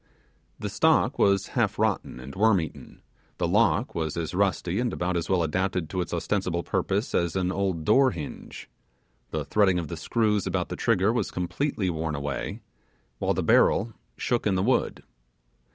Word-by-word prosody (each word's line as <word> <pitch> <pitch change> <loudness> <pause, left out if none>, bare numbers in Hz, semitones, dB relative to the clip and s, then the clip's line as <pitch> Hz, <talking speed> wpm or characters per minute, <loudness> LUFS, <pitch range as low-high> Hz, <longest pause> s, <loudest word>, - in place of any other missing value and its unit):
The - - -4
stock - - +2
was 100 -1 +3
half - - 0
rotten - - -1
and 65 +2 -9
worm 110 -1 +4
eaten; 80 - -8 0.3
the - - 0
lock - - +2
was 80 -1 -3
as 85 0 -3
rusty 95 0 0
and 120 -1 0
about 90 +1 -2
as 85 - -2
well 90 -3 +2
adapted 90 0 -1
to 95 - -1
its 90 - -5
ostensible 85 0 -1
purpose - - -1
as 85 0 0
an 90 -1 0
old 95 -5 -1
door 130 +5 +5
hinge; 80 - -8 0.6
the 75 -2 -3
threading 95 +3 +3
of 85 -4 -3
the 85 - -4
screws 105 +3 0
about 90 -1 -1
the - - -4
trigger 110 -2 +2
was 120 -5 -1
completely 95 +2 -2
worn 80 -1 -3
away; 70 0 -4 0.6
while - - 0
the - - -1
barrel 110 +3 +3 0.2
shook 120 -3 0
in 100 - +2
the 95 - +1
wood. 125 +3 0
95 Hz, 175 wpm, -26 LUFS, 85-105 Hz, 0.6 s, door